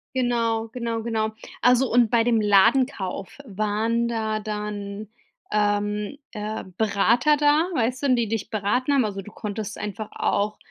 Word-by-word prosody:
Genau, 230 -3 0
genau, 230 -1 -3
genau. 220 -1 -1 0.3
Also, 250 +1 +4
und 240 -1 +4
bei 230 0 +3
dem 230 -1 +2
Ladenkauf 210 0 +2
waren 220 +1 -1
da 220 -2 -1
dann, 210 -1 -5 0.4
ähm, 205 +3 0
äh, 215 +1 -4
Berater 225 +7 +3
da, 295 +3 +3
weißt 250 +1 0
du, 265 -3 +4
die 235 -3 0
dich 225 -2 -3
beraten 225 +6 0
haben, 275 -2 +4
also, 200 -2 -3
du 210 - -13
konntest 210 -1 -5
einfach 210 +1 -5
auch, 205 +1 0
220 Hz, 145 wpm, -24 LUFS, 210-240 Hz, 0.4 s, Also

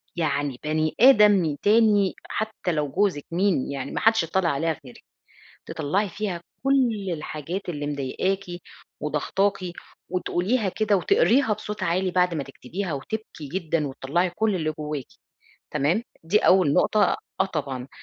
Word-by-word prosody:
يعني 145 -5 -1
بني 155 +1 0
آدم 210 - +6
تاني 210 -2 +4 0.2
حتى 215 -4 -2
لو 150 -3 -1
جوزِك 180 -3 0
مين 175 -6 +1
يعني، 135 -1 -4
ما - - -2
حدش 225 -4 +4
يضطّلع 170 +1 0
عليها 160 +2 -1
غيرِك، 125 - -13 0.6
تطلّعي 185 +8 -1
فيها 190 -2 -4 0.2
كل 240 -8 +2
الحاجات 160 +4 -5
اللي 145 -4 -3
مضايقاكِ 150 +8 -1 0.6
وضاغطاكِ 190 +7 0 0.5
وتقوليها 190 +5 0
كده 210 +2 +1
وتقريها 275 - +3
بصوت 210 0 -5
عالي 185 +2 +1
بعد 180 -1 +2
ما 150 - -2
تكتبيها، 165 +7 -5
وتبكي 155 +1 -6
جدًا 165 -4 -1
وتطلّعي 145 +6 -1
كل 210 +4 0
اللي 155 -4 -1
جواكِ، 150 -3 -4 0.7
تمام؟ 165 +11 +1 0.2
دي 185 +6 +3
أول 185 -8 +4
نقطة، 215 - +3 0.2
آه - - +5
طبعًا 140 -7 -4
180 Hz, 135 wpm, -25 LUFS, 150-205 Hz, 0.7 s, آدم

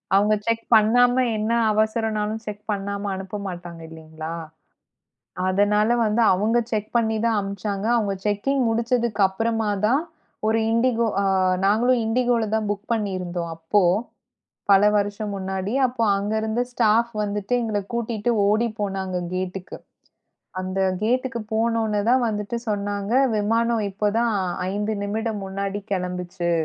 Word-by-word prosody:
அவங்க 210 +2 +4
செக் 230 0 0
பண்ணாம. 245 +3 +5 0.2
என்ன 215 +2 -1 0.2
அவசரம்னாலும் 220 0 0
செக் 210 0 -7
பண்ணாம 200 0 -3
அனுப்ப 190 +2 -6
மாட்டாங்க 175 -2 -7
இல்லீங்களா? 160 0 -8 1.2
அதனால 210 +3 +2 0.2
வந்து 215 +2 +1
அவங்க 215 +5 +1
செக் 215 -1 -2
பண்ணித்தான் 220 0 +1
அனுப்புச்சாங்க. 200 +1 -3
அவங்க 205 -3 0
செக்கிங் 215 +7 +1
முடிச்சதுக்கு 235 -1 0
அப்பறமாதான் 220 +4 0 0.5
ஒரு 225 +1 +2
Indigo 235 0 +2 0.2
ஆ - - 0 0.4
நாங்களும் 235 +5 +3
Indigoலதான் 225 -2 +1
புக் 205 0 -3
பண்ணியிருந்தோம், 185 -5 -3
அப்போ 165 +6 +2 0.9
பல 195 0 +7
வருஷம் 205 +1 -1
முன்னாடி. 190 +2 -3
அப்போ 245 -2 -3
அங்க 205 +2 -2
இருந்த 220 +2 -1
ஸ்டாஃப் 235 0 +2
வந்துட்டு 205 +3 -2
எங்களக் 205 -3 -3
கூட்டிட்டு 235 -1 -1 0.2
ஓடிப்போனாங்க 205 -4 -1 0.2
கேட்க்கு. 185 0 -5 0.8
அந்த 185 +1 -3 0.2
கேட்க்கு 245 +1 0
போனவுடனே 220 -2 +1
தான் 250 -1 +4
வந்துட்டு 210 +2 -3
சொன்னாங்க, 205 +1 -2 0.2
"விமானம் 225 +1 +1
இப்போ 210 +2 -1
தான் 235 -2 +1 0.4
5 210 +2 -1
நிமிடம் 215 0 -2
முன்னாடி 195 +1 -3
கிளம்பிச்சு" 180 -1 -2
210 Hz, 120 wpm, -23 LUFS, 195-225 Hz, 1.2 s, பல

